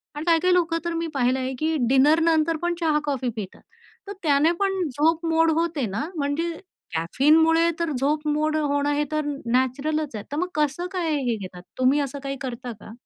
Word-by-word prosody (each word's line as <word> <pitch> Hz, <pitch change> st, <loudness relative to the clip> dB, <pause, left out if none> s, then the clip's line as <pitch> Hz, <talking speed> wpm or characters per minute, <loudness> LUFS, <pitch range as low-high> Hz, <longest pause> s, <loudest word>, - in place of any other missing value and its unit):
आणि 295 Hz, -, -4 dB
काही-काही 345 Hz, +2 st, +3 dB
लोकं 335 Hz, -2 st, +2 dB
तर 340 Hz, -, -1 dB
मी 330 Hz, 0 st, -2 dB
पाहिलं 260 Hz, -1 st, +1 dB
आहे 260 Hz, 0 st, -3 dB
की 320 Hz, +1 st, 0 dB
डिनर 280 Hz, +5 st, +5 dB
नंतर 325 Hz, 0 st, +2 dB
पण 345 Hz, 0 st, 0 dB
चहा-कॉफी 295 Hz, -5 st, 0 dB
पितात. 205 Hz, -4 st, -7 dB, 0.5 s
तर 400 Hz, -, -5 dB
त्याने 300 Hz, +1 st, +4 dB
पण 390 Hz, -1 st, 0 dB
झोप 315 Hz, +5 st, +1 dB
मोड 325 Hz, 0 st, +3 dB
होते 330 Hz, -6 st, -1 dB
ना? 215 Hz, -, -3 dB
म्हणजे 300 Hz, +3 st, -1 dB, 0.4 s
कॅफीनमुळे 320 Hz, -, +3 dB
तर 335 Hz, -2 st, -1 dB
झोप 300 Hz, +3 st, 0 dB
मोड 305 Hz, +1 st, +1 dB
होणं 285 Hz, -1 st, 0 dB
हे 295 Hz, +1 st, +1 dB
तर 305 Hz, -1 st, -1 dB, 0.3 s
नॅचरलच 275 Hz, +3 st, 0 dB
आहे. 210 Hz, -, -5 dB
तर 290 Hz, -, -3 dB
मग 360 Hz, +3 st, 0 dB
कसं 300 Hz, +4 st, 0 dB
काय 335 Hz, -4 st, 0 dB
हे 235 Hz, -, +1 dB
घेतात? 185 Hz, -3 st, -9 dB, 0.2 s
तुम्ही 255 Hz, +3 st, +3 dB
असं 280 Hz, 0 st, -4 dB
काही 275 Hz, 0 st, -4 dB
करता 250 Hz, -2 st, -5 dB
का? -, -, -12 dB
300 Hz, 190 wpm, -24 LUFS, 270-330 Hz, 0.5 s, डिनर